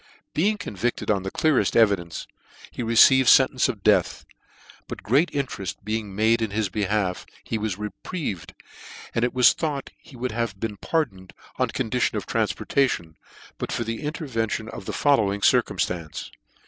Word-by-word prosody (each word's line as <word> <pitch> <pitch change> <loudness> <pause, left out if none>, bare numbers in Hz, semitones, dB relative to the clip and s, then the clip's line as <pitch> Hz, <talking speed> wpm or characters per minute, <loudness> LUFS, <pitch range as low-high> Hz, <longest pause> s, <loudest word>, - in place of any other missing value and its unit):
Being 205 +7 +1
convicted 120 - -2
on 100 -2 +1
the 95 - -4
cleareft 155 +6 +1
evidence, 100 -7 +2 0.5
he - - -6
received 120 +3 +6
fentence 130 -1 +5
of 105 -6 -5
death; - - +2 0.6
but - - -8
great 140 - +3
intereft 130 -9 -3
be 110 +2 -1
ing 100 -3 -9
made 110 +2 +3
in 110 - 0
his 105 0 -1
behalf, 100 -2 -1 0.2
he 110 - -3
was 105 -3 -2
reprieved, 105 - -5 0.6
and 115 - 0
it 125 +1 0
was 125 -1 +6
thought 145 -4 -3
he 135 - -16
would 125 +1 -3
have 110 -3 -3
been 105 -2 -4
pardoned, 100 - -2 0.3
oil - - +2
condition - - -1
of - - -4
tranfportation, 105 - 0 0.5
but - - -4
for 120 - -1
the 115 +2 -4
interven 140 - -2
tion 110 +1 -4
of 95 - -8
the - - -3
following 105 -9 +2
circumftance. 85 -5 0
115 Hz, 160 wpm, -24 LUFS, 100-130 Hz, 0.6 s, received